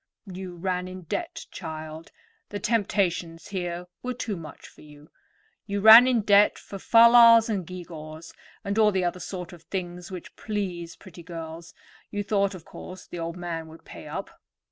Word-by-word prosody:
"You 185 Hz, -2 st, -8 dB
ran 180 Hz, +1 st, -2 dB
in 185 Hz, 0 st, -9 dB
debt, 330 Hz, -, -4 dB
child; 160 Hz, -1 st, -8 dB, 0.4 s
the 205 Hz, -, -4 dB
temptations 190 Hz, -6 st, -1 dB
here 175 Hz, -2 st, -4 dB, 0.2 s
were 250 Hz, 0 st, -4 dB
too 225 Hz, -4 st, -3 dB
much 160 Hz, -4 st, -10 dB
for -, -, -18 dB
you. 150 Hz, 0 st, -16 dB, 0.6 s
You 200 Hz, 0 st, -2 dB
ran 220 Hz, +4 st, +10 dB
in 245 Hz, -3 st, +2 dB
debt 205 Hz, 0 st, +5 dB
for 195 Hz, -, -9 dB
fal 230 Hz, +3 st, +6 dB
lals 230 Hz, -1 st, +8 dB
and 195 Hz, -6 st, -2 dB
gew 180 Hz, -1 st, -7 dB
gaws, 155 Hz, 0 st, -10 dB, 0.3 s
and 200 Hz, +1 st, -1 dB
all 215 Hz, -1 st, +5 dB
the 190 Hz, -2 st, 0 dB
other 175 Hz, +1 st, -2 dB
sort 180 Hz, -1 st, -7 dB
of 170 Hz, -, -13 dB
things 175 Hz, 0 st, -6 dB
which 185 Hz, -2 st, -9 dB
please 185 Hz, -6 st, -4 dB
pretty 180 Hz, -3 st, -13 dB
girls; 165 Hz, 0 st, -9 dB, 0.3 s
you 205 Hz, 0 st, -3 dB
thought, 200 Hz, -1 st, 0 dB
of 170 Hz, -, -12 dB
course, 185 Hz, 0 st, -10 dB
the 175 Hz, -, -8 dB
old 165 Hz, +1 st, -4 dB
man 170 Hz, -2 st, -5 dB
would 160 Hz, +1 st, -15 dB
pay -, -, -11 dB
up. -, -, -6 dB
180 Hz, 180 wpm, -26 LUFS, 170-205 Hz, 0.6 s, ran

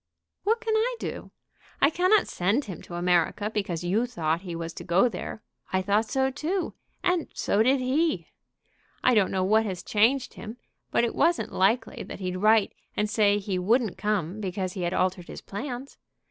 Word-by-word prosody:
"What 450 Hz, +3 st, +2 dB
can 440 Hz, -1 st, 0 dB
I 475 Hz, +3 st, +1 dB
do? -, -, -5 dB, 0.5 s
I 280 Hz, -, +5 dB
cannot 370 Hz, +5 st, +3 dB
send 205 Hz, +11 st, 0 dB
him 190 Hz, -4 st, -7 dB
to 175 Hz, -, -9 dB
America 180 Hz, +4 st, +1 dB
because 190 Hz, -6 st, -2 dB
you 210 Hz, +8 st, +1 dB
thought 165 Hz, -8 st, -1 dB
he 180 Hz, -3 st, -6 dB
was 165 Hz, 0 st, -5 dB
to -, -, -8 dB
go 180 Hz, +8 st, +4 dB
there. 215 Hz, 0 st, -6 dB, 0.3 s
I 190 Hz, 0 st, +1 dB
thought 210 Hz, +3 st, +1 dB
so 265 Hz, 0 st, +1 dB
too; 330 Hz, +7 st, -2 dB, 0.3 s
and 360 Hz, -2 st, +1 dB
so 205 Hz, -, +1 dB
did 260 Hz, +4 st, +4 dB
he. 295 Hz, +6 st, +1 dB, 0.8 s
I 255 Hz, -, +5 dB
don't 205 Hz, -5 st, +4 dB
know 190 Hz, -1 st, 0 dB
what 215 Hz, +4 st, +4 dB
has 185 Hz, -3 st, -4 dB
changed 235 Hz, +6 st, +2 dB
him; 225 Hz, +2 st, -8 dB, 0.3 s
but -, -, +2 dB
it 235 Hz, -, 0 dB
wasn't 340 Hz, +1 st, +1 dB
likely 225 Hz, +5 st, +1 dB
that -, -, -8 dB
he'd 185 Hz, -1 st, -3 dB
write 215 Hz, +1 st, +4 dB, 0.2 s
and 210 Hz, -, +2 dB
say 205 Hz, -1 st, +3 dB
he 195 Hz, -2 st, -2 dB
wouldn't 225 Hz, +3 st, +2 dB
come 205 Hz, -1 st, -1 dB
because 185 Hz, -1 st, -3 dB
he 185 Hz, -, -5 dB
had 175 Hz, +1 st, -1 dB
altered 180 Hz, -1 st, 0 dB
his -, -, -8 dB
plans. 245 Hz, +5 st, -6 dB
210 Hz, 190 wpm, -27 LUFS, 185-255 Hz, 0.8 s, I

